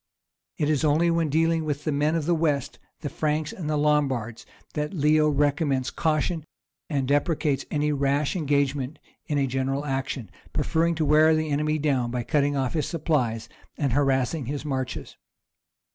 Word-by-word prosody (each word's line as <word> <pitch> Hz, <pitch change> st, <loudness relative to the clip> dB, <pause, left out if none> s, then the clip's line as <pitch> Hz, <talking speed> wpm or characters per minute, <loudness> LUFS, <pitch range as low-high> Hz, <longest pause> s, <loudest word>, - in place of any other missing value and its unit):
It 150 Hz, -, +1 dB
is 150 Hz, -2 st, +1 dB
only 160 Hz, +3 st, +3 dB
when 165 Hz, -2 st, +1 dB
dealing 165 Hz, +2 st, +2 dB
with 150 Hz, -1 st, -3 dB
the 155 Hz, -, 0 dB
men 150 Hz, +3 st, +1 dB
of 160 Hz, -3 st, -1 dB
the 175 Hz, -, +2 dB
West, 150 Hz, -5 st, 0 dB, 0.2 s
the 150 Hz, -, -3 dB
Franks 150 Hz, 0 st, -1 dB
and 170 Hz, -5 st, -6 dB
Lombards, 145 Hz, -7 st, 0 dB, 0.3 s
that 150 Hz, +5 st, -3 dB
Leo 150 Hz, 0 st, +4 dB
recommends 145 Hz, -2 st, +1 dB
caution 160 Hz, +1 st, 0 dB, 0.5 s
and 140 Hz, -5 st, 0 dB
deprecates 145 Hz, 0 st, +1 dB
any 150 Hz, 0 st, 0 dB
rash 140 Hz, +2 st, +1 dB
engagement 145 Hz, -3 st, 0 dB, 0.3 s
in 150 Hz, -3 st, 0 dB
a 140 Hz, -, +2 dB
general 135 Hz, +2 st, -1 dB
action, 135 Hz, -6 st, -3 dB, 0.2 s
preferring 165 Hz, +1 st, +1 dB
to 160 Hz, -1 st, 0 dB
wear 155 Hz, +2 st, +5 dB
the 155 Hz, -1 st, -1 dB
enemy 150 Hz, +2 st, +1 dB
down 135 Hz, -5 st, 0 dB
by 120 Hz, 0 st, -2 dB
cutting 145 Hz, +2 st, +1 dB
off 130 Hz, -2 st, -1 dB
his 155 Hz, -3 st, -1 dB
supplies 130 Hz, -9 st, -1 dB, 0.3 s
and 140 Hz, -5 st, 0 dB
harassing 135 Hz, 0 st, +1 dB
his 145 Hz, +2 st, -4 dB
marches. 130 Hz, -, -4 dB
145 Hz, 160 wpm, -25 LUFS, 135-155 Hz, 0.5 s, wear